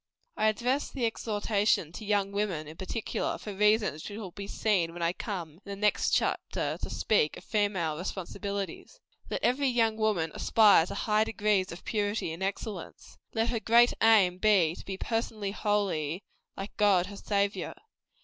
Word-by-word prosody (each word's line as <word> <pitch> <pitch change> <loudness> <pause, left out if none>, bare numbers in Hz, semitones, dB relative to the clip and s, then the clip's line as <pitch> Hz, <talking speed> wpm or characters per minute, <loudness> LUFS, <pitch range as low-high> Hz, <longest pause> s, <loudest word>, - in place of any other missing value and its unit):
I 215 - +2
address 245 +6 0
this 265 - -5
exhortation 210 -6 0
to 215 +5 -8
Young 200 -1 +1
Women, 195 -7 -2
in 155 - -9
particular, 195 +5 -3
for 210 - -7
reasons 210 -5 +2
which 205 - -7
will 200 -5 -7
be 200 +2 -7
seen 185 -6 0
when 175 0 -5
I 170 +1 +1
come, 175 -7 -5
in - - -12
the 200 - -4
next 210 +1 +2
chapter, - - -1
to - - -4
speak 205 -8 +1
of - - -11
female 195 -7 0
responsibilities. 200 - -5 0.3
Let - - -3
every 270 +3 +2
young 225 -3 +2
woman 205 -8 +1
aspire 210 -7 +5
to - - -6
high 215 0 +2
degrees 210 -3 +1
of 170 - -10
purity 205 -5 -1
and 165 - -9
excellence. 195 -1 -5 0.2
Let 225 +1 +1
her 235 - -1
great 235 +2 +5
aim 200 -5 +5
be, 190 -7 +4
to - - -10
be 190 -1 -5
personally 220 -2 -2
holy 195 -5 -1 0.3
like 195 +1 -6
God 200 -4 +4
her 200 +1 -9
Saviour. 200 0 -1
205 Hz, 170 wpm, -29 LUFS, 185-220 Hz, 0.3 s, aspire